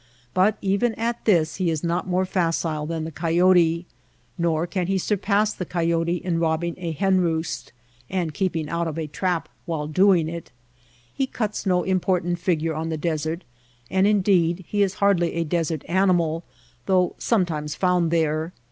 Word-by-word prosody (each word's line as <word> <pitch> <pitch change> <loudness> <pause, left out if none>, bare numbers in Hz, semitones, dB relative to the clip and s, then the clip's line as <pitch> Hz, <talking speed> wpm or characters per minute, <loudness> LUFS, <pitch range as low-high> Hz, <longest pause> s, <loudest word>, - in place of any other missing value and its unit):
But 195 +3 +3
even 200 +4 +1
at 235 +1 -3
this 165 -7 +3
he 185 -3 +1
is 160 -1 -2
not 170 +2 -1
more 185 +1 +1
facile 165 -4 -1
than 165 -1 -3
the 160 - -5
coyote. 170 +1 +3 0.5
Nor 170 -2 0
can 180 0 -2
he 195 0 +1
surpass 205 +2 +1
the - - -5
coyote 170 -1 0
in 175 -1 -2
robbing 165 +1 0
a 170 -2 -3
hen 185 +4 +2
roost 160 -1 -2 0.4
and 175 -5 -2
keeping 170 -5 -1
out 170 +2 -1
of 160 -1 -4
a 160 - -2
trap 170 +2 -2 0.2
while 160 -3 -2
doing 175 +1 +3
it. 170 0 -6 0.6
He 270 - -1
cuts 215 -5 -3
no 180 -1 +2
important 180 -2 0
fig 170 -3 0
ure 165 -1 0
on 160 +1 -3
the 160 - -2
desert 160 +2 -2 0.5
and, 190 +1 +3
indeed, 190 -4 +2
he 205 - 0
is 195 -1 +1
hardly 195 -5 +2
a 170 - +1
desert 165 -2 -1
animal 175 -3 +2 0.4
though 185 -2 +3
sometimes 160 -9 0
found 180 -3 +2
there. 160 0 0
170 Hz, 170 wpm, -24 LUFS, 165-190 Hz, 0.6 s, But